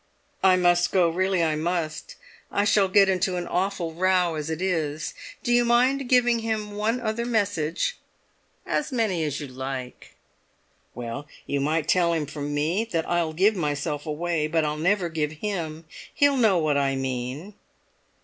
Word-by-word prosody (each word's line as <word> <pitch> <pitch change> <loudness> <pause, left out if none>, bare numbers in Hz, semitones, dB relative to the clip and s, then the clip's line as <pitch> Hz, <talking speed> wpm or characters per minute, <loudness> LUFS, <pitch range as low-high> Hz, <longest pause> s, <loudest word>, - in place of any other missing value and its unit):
"I 190 -1 +6
must 175 -1 +3
go—really 185 0 +2
I 160 -2 +1
must. 160 -1 -3 0.4
I 205 - +1
shall 200 -1 +4
get 195 +1 +5
into 185 -1 +1
an 175 - -3
awful 180 -2 -2
row 180 0 +2
as 155 0 -4
it 160 0 -3
is. 160 -5 -2 0.3
Do 240 - +1
you 240 0 +5
mind 250 +3 +2
giving 245 -2 +4
him 220 -2 -3
one 215 +4 -1
other 230 0 -2
message?" 205 - -1 0.7
"As 300 - -1
many 215 -9 0
as 145 -2 -2
you 150 - -5
like." 130 -1 -7 0.8
"Well, 120 +4 -6 0.2
you 140 - -1
might 155 +2 0
tell 170 -1 +3
him 160 -2 -1
from 145 0 -5
me 155 +8 0
that 165 -8 -2
I'll 170 -2 0
give 200 +6 +3
myself 150 -2 -2
away, 155 0 -1
but 160 0 +1
I'll 150 0 -1
never 180 +4 +1
give 155 -2 -2
him! 165 -3 -4 0.3
He'll 285 -1 +3
know 220 -7 +4
what 155 -3 +1
I 135 -1 +1
mean." 135 +7 -4
175 Hz, 165 wpm, -25 LUFS, 150-205 Hz, 0.8 s, I